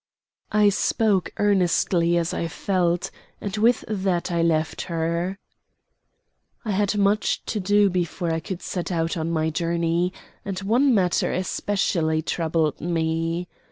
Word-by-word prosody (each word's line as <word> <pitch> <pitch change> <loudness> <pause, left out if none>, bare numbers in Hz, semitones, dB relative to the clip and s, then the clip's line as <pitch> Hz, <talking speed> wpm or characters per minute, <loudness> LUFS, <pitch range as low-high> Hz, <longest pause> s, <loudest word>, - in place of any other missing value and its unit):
I 210 -1 +5
spoke 200 -1 +1
earnestly 175 -3 +2
as 170 0 0
I 170 - -2
felt, 175 0 0 0.3
and 200 -1 -4
with 230 +3 +3
that 190 -4 -1
I 170 -1 +1
left 160 -1 +1
her. 170 +3 -1 1.3
I 215 - -1
had 205 +1 +1
much 205 +1 +1
to 215 - -2
do 205 +1 +3
before 175 -2 -1
I 160 - 0
could 185 +1 -6
set 180 0 -3
out 165 0 0
on 160 -1 -2
my 160 -1 0
journey, 170 +1 0 0.3
and 195 -2 -4
one 240 +6 +3
matter 180 -3 +2
especially 180 -4 0
troubled 160 -3 -1
me. 165 +1 -1
175 Hz, 135 wpm, -24 LUFS, 165-200 Hz, 1.3 s, I